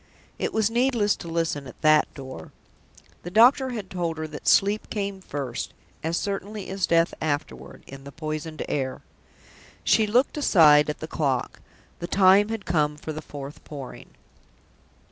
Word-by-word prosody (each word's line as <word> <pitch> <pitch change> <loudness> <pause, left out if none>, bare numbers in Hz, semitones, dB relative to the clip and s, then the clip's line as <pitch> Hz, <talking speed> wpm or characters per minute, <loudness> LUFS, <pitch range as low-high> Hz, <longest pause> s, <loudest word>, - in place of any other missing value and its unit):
It - - -1
was 220 0 +1
needless 235 -4 +2
to - - -9
listen 165 -4 -2
at - - -13
that 155 0 +4
door. 130 -2 -9 0.7
The 175 - -7
doctor 250 +7 +5
had 215 -6 -6
told 170 -3 -2
her 155 - -3
that 150 - -9
Sleep 205 +2 +3
came 200 -2 -3
first, 140 -8 -5 0.3
as 165 +2 -1
certainly 200 0 -4
as 190 -2 -1
Death 165 0 +3
afterward, 145 - -4
in 135 0 -11
the 140 - -10
poisoned 155 +1 -5
air. 130 -2 -3 0.8
She 220 - +3
looked 245 +8 +2
aside 150 - +6
at 150 - -4
the 155 - -5
clock. 140 -6 -2 0.4
The 170 - -4
time 195 +2 +5
had 225 -2 -4
come 150 -3 +1
for 155 +1 -6
the 155 - -6
fourth 145 -1 -9
Pouring. 140 -4 -9
165 Hz, 160 wpm, -25 LUFS, 150-200 Hz, 0.8 s, aside